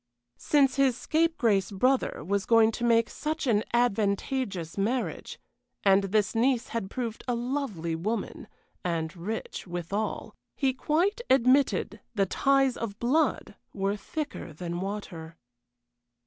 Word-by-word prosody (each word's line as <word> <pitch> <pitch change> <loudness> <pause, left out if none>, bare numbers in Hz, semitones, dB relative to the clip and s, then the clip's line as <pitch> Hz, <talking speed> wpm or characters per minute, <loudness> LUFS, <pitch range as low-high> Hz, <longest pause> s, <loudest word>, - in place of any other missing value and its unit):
Since 280 -3 +3
his 265 -3 +3
scapegrace 265 - +1
brother 250 - +1
was 200 +2 -1
going 225 -1 +5
to 240 - -5
make 230 -1 +4
such 310 +1 -3
an 220 -4 +2
advantageous 205 -5 0
marriage, 230 +6 -2 0.4
and 195 0 +4
this 205 0 +1
niece 240 +1 +1
had 230 -5 -3
proved 235 -2 -4
a 245 - +1
lovely 235 - -2
woman, 215 +8 -3 0.4
and 165 -3 -2
rich 195 +3 -5
withal, 175 +5 -3 0.2
he 270 -2 +1
quite 345 - 0
admitted 255 -5 +3
the 200 -2 +3
ties 270 +5 +2
of 205 -3 -5
blood 270 +8 +1 0.2
were 195 0 0
thicker 290 - -5
than 170 +2 -5
water. 180 -5 -6
225 Hz, 125 wpm, -28 LUFS, 195-265 Hz, 0.4 s, going